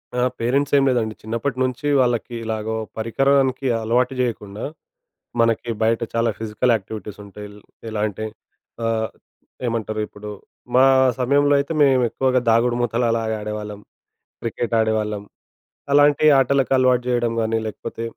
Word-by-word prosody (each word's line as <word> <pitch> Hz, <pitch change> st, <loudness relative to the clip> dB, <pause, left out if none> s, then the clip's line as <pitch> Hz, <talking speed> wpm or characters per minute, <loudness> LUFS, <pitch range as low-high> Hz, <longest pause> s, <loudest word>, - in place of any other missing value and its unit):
ఆ! 125 Hz, -, 0 dB, 0.2 s
పేరెంట్స్ 135 Hz, +5 st, 0 dB
ఏం 140 Hz, -, +4 dB
లేదండి 110 Hz, -4 st, 0 dB
చిన్నప్పటి 115 Hz, +4 st, -3 dB
నుంచి 130 Hz, +3 st, -2 dB
వాళ్ళకి 120 Hz, -1 st, 0 dB
ఇలాగో 110 Hz, 0 st, -3 dB, 0.2 s
పరికరానికి 135 Hz, +3 st, +1 dB
అలవాటు 125 Hz, +4 st, +1 dB
జేయకుండా, 105 Hz, -4 st, -3 dB, 0.8 s
మనకి 115 Hz, 0 st, +1 dB
బయట 115 Hz, +1 st, +2 dB
చాలా 115 Hz, 0 st, +2 dB
ఫిజికల్ 110 Hz, +2 st, 0 dB
యాక్టివిటీస్ 105 Hz, 0 st, -6 dB
ఉంటాయి. 105 Hz, +1 st, -10 dB
ఎల్ 105 Hz, 0 st, -14 dB, 0.3 s
ఎలా 110 Hz, -1 st, -3 dB
అంటే 105 Hz, +2 st, -6 dB, 0.6 s
ఆహ్, 110 Hz, -1 st, 0 dB, 0.6 s
ఏమంటారు? 110 Hz, -2 st, -2 dB
ఇప్పుడు 105 Hz, 0 st, -11 dB, 0.5 s
మా 130 Hz, -, +7 dB, 0.4 s
సమయంలో 145 Hz, +3 st, +3 dB
అయితే 140 Hz, +3 st, -2 dB
మేము 130 Hz, -2 st, +4 dB
ఎక్కువగా 130 Hz, -1 st, +1 dB
దాగుడుమూతలు 120 Hz, +1 st, +1 dB
అలాగ 115 Hz, -1 st, -1 dB
ఆడేవాళ్ళం, 105 Hz, -1 st, -6 dB, 0.6 s
క్రికెట్ 115 Hz, 0 st, -2 dB
ఆడేవాళ్ళం 105 Hz, -2 st, 0 dB, 0.7 s
అలాంటి 145 Hz, +1 st, +5 dB
ఆటలకు 135 Hz, 0 st, +2 dB
అలవాటు 125 Hz, -1 st, +3 dB
చేయడం 120 Hz, -1 st, +1 dB
గానీ 115 Hz, 0 st, 0 dB
లేకపోతే 115 Hz, +1 st, -6 dB
115 Hz, 130 wpm, -21 LUFS, 110-130 Hz, 0.8 s, మా